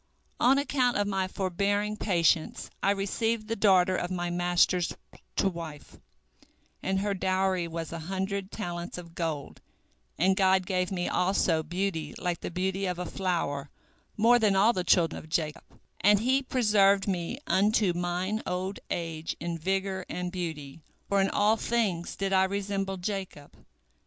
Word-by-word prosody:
On 265 Hz, +3 st, +5 dB
account 265 Hz, -3 st, +1 dB
of 205 Hz, -, +1 dB
my 195 Hz, -2 st, 0 dB
forbearing 200 Hz, +3 st, -1 dB
patience 170 Hz, -6 st, +1 dB
I -, -, +2 dB
received 215 Hz, +3 st, 0 dB
the 225 Hz, -, -1 dB
daughter 185 Hz, -3 st, +4 dB
of 175 Hz, -, -2 dB
my 175 Hz, -1 st, -2 dB
master 175 Hz, +1 st, +2 dB, 0.5 s
to -, -, +2 dB
wife, 165 Hz, -5 st, -7 dB, 0.8 s
and 190 Hz, 0 st, 0 dB
her 205 Hz, 0 st, 0 dB
dowry 185 Hz, -2 st, 0 dB
was 165 Hz, -1 st, -5 dB
a 165 Hz, -, -4 dB
hundred 190 Hz, +3 st, -3 dB
talents 175 Hz, -4 st, -5 dB
of 170 Hz, -2 st, -10 dB
gold, 160 Hz, -5 st, -4 dB, 0.6 s
and 190 Hz, +3 st, +3 dB
God 190 Hz, -1 st, +3 dB
gave 180 Hz, -1 st, -1 dB
me 175 Hz, -2 st, -1 dB
also 180 Hz, -3 st, +2 dB
beauty 165 Hz, -2 st, -3 dB
like 175 Hz, -2 st, -2 dB
the -, -, -4 dB
beauty 190 Hz, +2 st, -1 dB
of 180 Hz, -1 st, -2 dB
a 180 Hz, -, -3 dB
flower, 165 Hz, -8 st, -2 dB, 0.5 s
more 235 Hz, +3 st, +5 dB
than 210 Hz, -3 st, +3 dB
all 210 Hz, +5 st, +5 dB
the 185 Hz, -, -1 dB
children 170 Hz, -1 st, +3 dB
of 155 Hz, -, -13 dB
Jacob, 155 Hz, 0 st, -2 dB, 0.3 s
and 205 Hz, +1 st, +5 dB
He 260 Hz, +4 st, +3 dB
preserved 210 Hz, -7 st, +3 dB
me 185 Hz, +4 st, -2 dB
unto 205 Hz, -, +3 dB
mine 180 Hz, +5 st, -1 dB
old 185 Hz, +2 st, -3 dB
age 165 Hz, -1 st, -3 dB
in 170 Hz, +1 st, -3 dB
vigor 190 Hz, +2 st, -2 dB
and 180 Hz, 0 st, -3 dB
beauty, 160 Hz, -5 st, -5 dB, 0.3 s
for 200 Hz, -1 st, +3 dB
in 195 Hz, -, +2 dB
all 210 Hz, +2 st, +3 dB
things 210 Hz, -8 st, -1 dB
did 195 Hz, 0 st, -1 dB
I 190 Hz, 0 st, +5 dB
resemble 195 Hz, 0 st, -2 dB
Jacob." 185 Hz, -6 st, -5 dB
190 Hz, 155 wpm, -28 LUFS, 175-200 Hz, 0.8 s, On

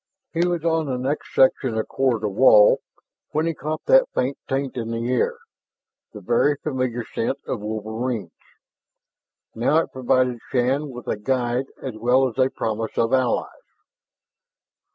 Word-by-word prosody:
He 170 Hz, +1 st, +2 dB
was 175 Hz, -2 st, -2 dB
on 160 Hz, -2 st, +1 dB
the 130 Hz, -2 st, -2 dB
next 135 Hz, +4 st, -3 dB
section 130 Hz, -3 st, +3 dB
of 110 Hz, -, -1 dB
corridor 120 Hz, -5 st, 0 dB
wall 105 Hz, 0 st, +6 dB, 0.5 s
when 155 Hz, +2 st, +1 dB
he 165 Hz, -, 0 dB
caught 155 Hz, +1 st, -5 dB
that -, -, +5 dB
faint 130 Hz, +2 st, 0 dB
taint 135 Hz, 0 st, -2 dB
in 115 Hz, -2 st, -4 dB
the 115 Hz, +1 st, -2 dB
air, 125 Hz, -, +1 dB, 0.7 s
the 105 Hz, -, -10 dB
very 120 Hz, +8 st, +2 dB
familiar 130 Hz, -5 st, -3 dB
scent 125 Hz, +4 st, -2 dB
of 125 Hz, -, -3 dB
wolverines. 110 Hz, -1 st, -4 dB, 1.2 s
Now 120 Hz, +7 st, +2 dB
it 165 Hz, -, 0 dB
provided 125 Hz, -1 st, +1 dB
Shann 135 Hz, +4 st, 0 dB
with 125 Hz, -2 st, -9 dB
a -, -, -1 dB
guide 125 Hz, +2 st, -1 dB, 0.2 s
as 130 Hz, -4 st, -5 dB
well 125 Hz, +4 st, +3 dB
as 125 Hz, +1 st, -7 dB
a 130 Hz, 0 st, +4 dB
promise 110 Hz, -2 st, -3 dB
of 115 Hz, +2 st, +1 dB
allies. 130 Hz, -2 st, +1 dB
130 Hz, 155 wpm, -23 LUFS, 115-135 Hz, 1.2 s, wall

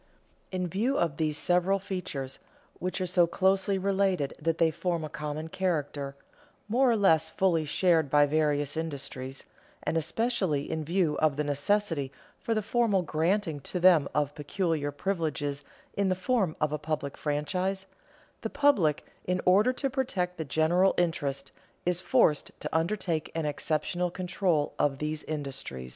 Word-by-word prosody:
In 185 Hz, -1 st, -1 dB
view 220 Hz, +10 st, 0 dB
of 165 Hz, -5 st, 0 dB
these 155 Hz, -2 st, 0 dB
several 180 Hz, +4 st, +2 dB
features, 180 Hz, -9 st, -5 dB, 0.4 s
which 185 Hz, +2 st, -2 dB
are -, -, +1 dB
so 175 Hz, -1 st, +3 dB
closely 190 Hz, +2 st, +2 dB
related 190 Hz, -6 st, +1 dB
that 165 Hz, +1 st, 0 dB
they 165 Hz, -1 st, +3 dB
form 170 Hz, 0 st, -2 dB
a 155 Hz, -, -4 dB
common 150 Hz, 0 st, -4 dB
character, 150 Hz, -6 st, -2 dB, 0.5 s
more 250 Hz, +4 st, +3 dB
or 235 Hz, -, +4 dB
less 160 Hz, -6 st, +4 dB
fully 170 Hz, -3 st, +1 dB
shared 160 Hz, -1 st, +2 dB
by 145 Hz, +1 st, +5 dB
various 145 Hz, -1 st, +1 dB
industries, 135 Hz, -4 st, -5 dB, 0.4 s
and -, -, -1 dB
especially 170 Hz, -, 0 dB
in 160 Hz, -1 st, -2 dB
view 170 Hz, -1 st, +1 dB
of 155 Hz, -3 st, +3 dB
the 150 Hz, -, 0 dB
necessity 145 Hz, 0 st, 0 dB, 0.3 s
for 225 Hz, -, -1 dB
the 215 Hz, -, 0 dB
formal 220 Hz, -4 st, +2 dB
granting 165 Hz, 0 st, 0 dB
to 180 Hz, +6 st, -4 dB
them 170 Hz, -5 st, +5 dB
of 145 Hz, -1 st, +1 dB
peculiar 150 Hz, 0 st, -1 dB
privileges 150 Hz, -4 st, -2 dB, 0.3 s
in 200 Hz, -1 st, +1 dB
the 185 Hz, -, +2 dB
form 190 Hz, -3 st, 0 dB
of 150 Hz, -1 st, +1 dB
a 150 Hz, -, -2 dB
public 150 Hz, -2 st, -3 dB
franchise, 180 Hz, +6 st, -1 dB, 0.6 s
the 225 Hz, -, -3 dB
public, 250 Hz, -, +2 dB, 0.2 s
in 180 Hz, 0 st, 0 dB
order 205 Hz, +7 st, +5 dB
to 275 Hz, +2 st, -2 dB
protect 235 Hz, -10 st, -2 dB
the 160 Hz, -, -2 dB
general 170 Hz, +6 st, +3 dB
interest, 160 Hz, -5 st, -1 dB, 0.3 s
is 180 Hz, 0 st, +1 dB
forced 155 Hz, -4 st, +3 dB
to 150 Hz, -, -5 dB
undertake 165 Hz, -2 st, 0 dB
an 165 Hz, -1 st, -1 dB
exceptional 155 Hz, +4 st, -1 dB
control 180 Hz, -3 st, 0 dB
of 140 Hz, -2 st, +2 dB
these 150 Hz, +1 st, -3 dB
industries. 135 Hz, -, -5 dB
165 Hz, 155 wpm, -29 LUFS, 150-190 Hz, 0.6 s, by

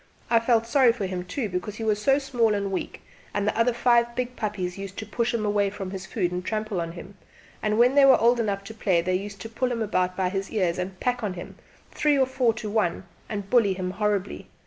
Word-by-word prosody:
I 230 Hz, -, +6 dB
felt 230 Hz, -1 st, +2 dB
sorry 250 Hz, 0 st, +5 dB
for 220 Hz, -5 st, -3 dB
him, 185 Hz, -1 st, -3 dB
too, 220 Hz, +6 st, -3 dB
because 180 Hz, +2 st, -4 dB
he 225 Hz, -, -6 dB
was 210 Hz, -1 st, +1 dB
small 265 Hz, -4 st, +2 dB
and 200 Hz, -1 st, -2 dB
weak, 190 Hz, -, -4 dB, 0.3 s
and 205 Hz, 0 st, 0 dB
the -, -, +1 dB
other 230 Hz, +2 st, +3 dB
five 235 Hz, 0 st, +2 dB
big 250 Hz, 0 st, -3 dB
puppies 195 Hz, -4 st, -3 dB
used 195 Hz, -1 st, -8 dB
to 220 Hz, -, -4 dB
push 230 Hz, +3 st, -1 dB
him 225 Hz, -2 st, -1 dB
away 205 Hz, -1 st, +2 dB
from 195 Hz, -2 st, -6 dB
his 190 Hz, -1 st, -6 dB
food 180 Hz, -7 st, -1 dB
and 180 Hz, 0 st, -3 dB
trample 215 Hz, -3 st, -2 dB
on 165 Hz, 0 st, -5 dB
him; 185 Hz, +3 st, -11 dB, 0.4 s
and 215 Hz, 0 st, 0 dB
when 245 Hz, +3 st, +5 dB
they 285 Hz, 0 st, +6 dB
were 270 Hz, -, +7 dB
old 235 Hz, +2 st, +4 dB
enough 200 Hz, -3 st, -1 dB
to 210 Hz, +3 st, -9 dB
play 185 Hz, -6 st, +1 dB
they 185 Hz, -, 0 dB
used 200 Hz, +2 st, -3 dB
to -, -, -5 dB
pull 250 Hz, +3 st, -2 dB
him 230 Hz, -2 st, -1 dB
about 185 Hz, -3 st, 0 dB
by 185 Hz, -1 st, +1 dB
his 195 Hz, 0 st, -3 dB
ears 185 Hz, -5 st, 0 dB
and 185 Hz, 0 st, -5 dB
pack 250 Hz, -1 st, -1 dB
on 205 Hz, -4 st, -2 dB
to 180 Hz, -, -8 dB
him 175 Hz, -, -9 dB, 0.4 s
three 295 Hz, -1 st, +2 dB
or 265 Hz, -, +4 dB
four 255 Hz, -2 st, +1 dB
to 220 Hz, -, -5 dB
one 205 Hz, -5 st, 0 dB, 0.3 s
and 205 Hz, -2 st, -5 dB
bully 225 Hz, -6 st, +4 dB
him 185 Hz, -1 st, -3 dB
horribly. 205 Hz, -1 st, -2 dB
210 Hz, 250 wpm, -25 LUFS, 190-235 Hz, 0.4 s, were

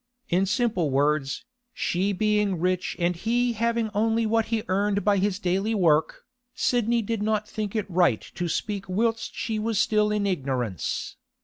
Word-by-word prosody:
In 185 Hz, +3 st, +2 dB
simple 210 Hz, -, +1 dB
words, 140 Hz, -, 0 dB, 0.3 s
she 190 Hz, +3 st, 0 dB
being 210 Hz, -2 st, +1 dB
rich 185 Hz, +1 st, 0 dB
and 175 Hz, 0 st, +1 dB
he 240 Hz, +6 st, 0 dB
having 230 Hz, 0 st, 0 dB
only 225 Hz, +2 st, +1 dB
what 225 Hz, 0 st, +2 dB
he 225 Hz, -1 st, -1 dB
earned 200 Hz, +2 st, 0 dB
by 205 Hz, -1 st, +4 dB
his 195 Hz, 0 st, +1 dB
daily 195 Hz, +3 st, 0 dB
work, 160 Hz, -5 st, +2 dB, 0.3 s
Sidney 235 Hz, -1 st, +1 dB
did 225 Hz, 0 st, -2 dB
not 215 Hz, 0 st, 0 dB
think 215 Hz, -1 st, -4 dB
it 215 Hz, -3 st, -1 dB
right 175 Hz, -, +2 dB
to 175 Hz, -, -3 dB
speak 200 Hz, +2 st, -3 dB
whilst 225 Hz, +4 st, -1 dB
she 220 Hz, -2 st, -2 dB
was 220 Hz, 0 st, -1 dB
still 210 Hz, 0 st, +2 dB
in 210 Hz, -1 st, 0 dB
ignorance. 130 Hz, -, -2 dB
205 Hz, 165 wpm, -25 LUFS, 180-220 Hz, 0.3 s, by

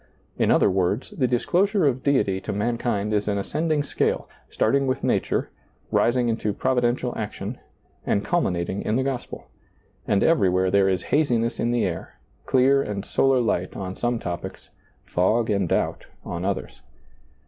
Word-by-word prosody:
In -, -, +1 dB
other -, -, +5 dB
words, 95 Hz, +5 st, 0 dB
the 130 Hz, -, 0 dB
disclosure 180 Hz, -, +2 dB
of 130 Hz, -2 st, +1 dB
Deity 115 Hz, -10 st, +1 dB
to -, -, -4 dB
mankind 105 Hz, -1 st, -1 dB
is 105 Hz, 0 st, 0 dB
an 100 Hz, -1 st, 0 dB
ascending 155 Hz, +8 st, 0 dB
scale, -, -, -1 dB, 0.2 s
starting 135 Hz, +4 st, +1 dB
with 130 Hz, +1 st, -1 dB
nature, -, -, 0 dB, 0.4 s
rising 120 Hz, 0 st, +2 dB
into 110 Hz, -2 st, -1 dB
providential 125 Hz, +1 st, 0 dB
action, 105 Hz, +2 st, -5 dB, 0.4 s
and 100 Hz, -, 0 dB
culminating 95 Hz, -, 0 dB
in 110 Hz, -, -1 dB
the 130 Hz, -, +1 dB
gospel; 135 Hz, -2 st, -5 dB, 0.6 s
and 100 Hz, -, +2 dB
everywhere 95 Hz, -, +3 dB
there 100 Hz, 0 st, +4 dB
is 95 Hz, -2 st, 0 dB
haziness 120 Hz, -6 st, +1 dB
in 120 Hz, -, +1 dB
the 120 Hz, -1 st, +1 dB
air, 85 Hz, -3 st, -5 dB, 0.3 s
clear 135 Hz, +1 st, +4 dB
and 105 Hz, -4 st, -4 dB
solar 135 Hz, -1 st, +2 dB
light 95 Hz, -6 st, -1 dB
on 95 Hz, -1 st, -5 dB
some 120 Hz, 0 st, -1 dB
topics, 90 Hz, -6 st, -6 dB, 0.3 s
fog 110 Hz, +6 st, +1 dB
and 100 Hz, -4 st, 0 dB
doubt -, -, -1 dB, 0.2 s
on 85 Hz, +1 st, -4 dB
others. 100 Hz, -1 st, -3 dB
115 Hz, 155 wpm, -24 LUFS, 100-130 Hz, 0.6 s, other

